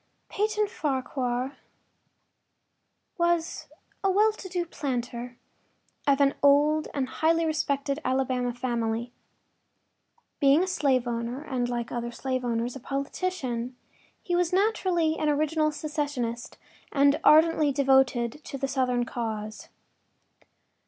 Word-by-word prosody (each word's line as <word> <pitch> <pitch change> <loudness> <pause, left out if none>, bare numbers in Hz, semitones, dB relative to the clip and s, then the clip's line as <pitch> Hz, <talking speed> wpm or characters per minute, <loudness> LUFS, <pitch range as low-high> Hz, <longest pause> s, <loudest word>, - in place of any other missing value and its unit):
II - - -45
Peyton 425 +1 +1
Farquhar 260 -6 -2 1.6
was 340 -1 0 0.4
a 390 - +3
well 425 +3 +4
to 390 -3 -9
do 355 -1 -1
planter, 245 -5 -4 0.7
of 280 -1 +4
an 275 -1 +4
old 295 +2 +4
and 270 -2 -1
highly 325 +5 +1
respected 280 -2 -1
Alabama 255 -1 0
family. 235 -1 -2 1.3
Being 280 +4 +5
a - - -2
slave 270 -8 +1
owner 235 +3 -3
and 250 -5 -2
like 240 -1 -3
other 240 0 -3
slave 255 +1 -3
owners 235 +1 -1
a - - -6
politician, 275 -3 -3 0.5
he 350 - -1
was 350 -1 +1
naturally 365 -5 +1
an 305 - +1
original 305 +1 +1
secessionist 290 -6 -3 0.3
and 280 +1 +4
ardently 310 -1 +5
devoted 265 -1 +2
to 275 - -6
the 275 0 -2
Southern 250 -2 0
cause. 215 -3 -5
275 Hz, 120 wpm, -27 LUFS, 245-315 Hz, 1.6 s, Being